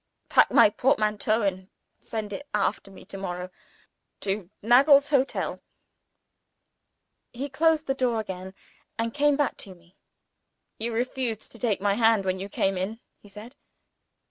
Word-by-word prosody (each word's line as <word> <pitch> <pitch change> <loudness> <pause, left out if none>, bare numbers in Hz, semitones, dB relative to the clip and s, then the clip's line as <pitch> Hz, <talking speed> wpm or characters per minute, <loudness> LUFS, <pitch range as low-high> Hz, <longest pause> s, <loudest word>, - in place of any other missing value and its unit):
"Pack - - +5
my 205 - +6
portmanteau, 215 -2 +1
and 190 -1 -2 0.3
send 215 -2 -5
it 285 +8 -7
after 200 -1 -1
me 195 - -14
to 195 - -8
morrow, 180 -1 -5 0.7
to 195 -2 -3
Nagle's 275 +5 +6
Hotel, 275 -2 +1
London." - - -9 1.7
He 270 +4 -5
closed 315 +3 +2
the 270 - 0
door 250 -4 0
again, 190 -2 -6 0.4
and 230 0 -2
came 290 0 +3
back 290 -3 0
to 190 -2 -6
me. 170 +1 -25 0.8
"You 230 +2 -2
refused 240 -1 -2
to 230 - -14
take 215 -5 0
my 200 0 +2
hand 225 -2 +3
when 185 0 -1
you 195 +1 -6
came 195 -1 0
in," 210 +5 -4 0.2
he 205 - -17
said. 215 +5 -11
220 Hz, 150 wpm, -26 LUFS, 195-255 Hz, 1.7 s, my